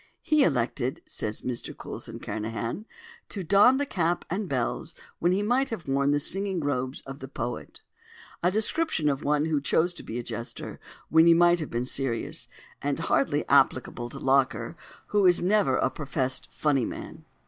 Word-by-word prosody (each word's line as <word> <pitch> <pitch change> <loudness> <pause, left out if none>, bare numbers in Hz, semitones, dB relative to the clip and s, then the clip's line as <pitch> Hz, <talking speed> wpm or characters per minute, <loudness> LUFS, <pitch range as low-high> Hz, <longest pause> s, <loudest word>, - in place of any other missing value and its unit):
"He 305 -2 +4
elected," 130 -2 0
says 105 0 -4
Mr 125 -2 -4
Coulson - - -7
Kernahan, 115 - -4 0.4
"to 195 - -5
don 205 +9 +6
the 285 - 0
cap 175 -8 -1
and 195 0 -2
bells 125 -3 -2 0.2
when 175 - +2
he 195 +3 +1
might 255 +5 +2
have 200 -10 -6
worn 140 +1 +2
the 145 0 +3
singing 195 +4 0
robes 130 -3 -2
of 135 +1 -9
the 135 - -7
poet": 120 -2 -5 0.6
a 175 - +3
description 215 - +1
of 140 +1 -2
one 150 +1 +2
who 155 -3 0
chose 170 +5 +2
to - - -9
be 115 - -6
a 120 - -3
jester 120 0 -6 0.3
when 160 +1 +6
he 170 - +7
might 175 +1 +5
have 155 - -4
been 120 +1 -2
serious, 130 -3 -1 0.3
and - - -1
hardly - - +2
applicable 120 0 +2
to - - -8
Locker, 135 +4 +1 0.3
who 205 -2 +4
is 175 -1 +4
never 205 +3 +3
a - - +1
professed 135 -3 -2
"funny 145 -4 +1
man." - - -8
150 Hz, 175 wpm, -27 LUFS, 130-185 Hz, 0.6 s, he